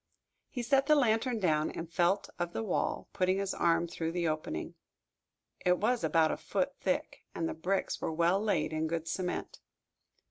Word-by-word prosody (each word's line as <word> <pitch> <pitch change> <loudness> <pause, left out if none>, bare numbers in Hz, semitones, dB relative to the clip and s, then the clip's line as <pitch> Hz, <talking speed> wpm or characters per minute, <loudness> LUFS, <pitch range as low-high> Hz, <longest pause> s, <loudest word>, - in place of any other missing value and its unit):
He 245 - -4
set 270 +3 +3
the 305 - +6
lantern 240 -2 +2
down 155 -5 +2
and 165 - -6
felt 175 +4 +1
of 175 0 -2
the - - -2
wall, 200 - -1
putting 185 +1 +2
his 195 -1 -1
arm 170 0 +2
through 165 -1 -3
the 175 -1 0
opening. 155 - -3 0.9
It 180 0 +4
was 235 +4 +1
about 160 -1 +3
a - - -2
foot - - -1
thick, - - -1
and 165 - -1
the - - -3
bricks 185 +4 -1
were - - -1
well 170 +4 +2
laid, 190 -8 0
in 155 0 0
good 165 0 -3
cement. 180 +2 -3
175 Hz, 180 wpm, -31 LUFS, 165-205 Hz, 0.9 s, the